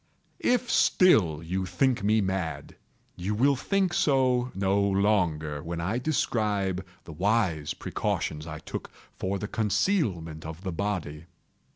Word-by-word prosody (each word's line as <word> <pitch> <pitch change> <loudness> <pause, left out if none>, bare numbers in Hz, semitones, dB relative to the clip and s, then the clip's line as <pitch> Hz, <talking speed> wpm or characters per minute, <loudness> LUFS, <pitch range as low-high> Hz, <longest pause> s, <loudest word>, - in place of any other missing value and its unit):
If 245 -1 +1
still 90 - +4
you 95 +3 -2
think 120 +5 +1
me 110 +2 +3
mad, 95 -4 -3 0.4
you 95 +4 -2
will 140 +5 +3
think 190 +6 0
so 130 -3 +2
no 95 +1 +1
longer 90 -7 +1
when 85 +2 -5
I 100 +8 -1
describe 105 - 0 0.2
the 80 - -10
wise 90 -4 0
precautions 75 +1 -3
I 75 -1 -6
took 80 - -7 0.3
for 95 +1 -1
the 105 - -4
concealment 100 - 0
of 80 +3 -8
the 95 - -3
body. 85 -5 -3
95 Hz, 135 wpm, -27 LUFS, 85-115 Hz, 0.4 s, still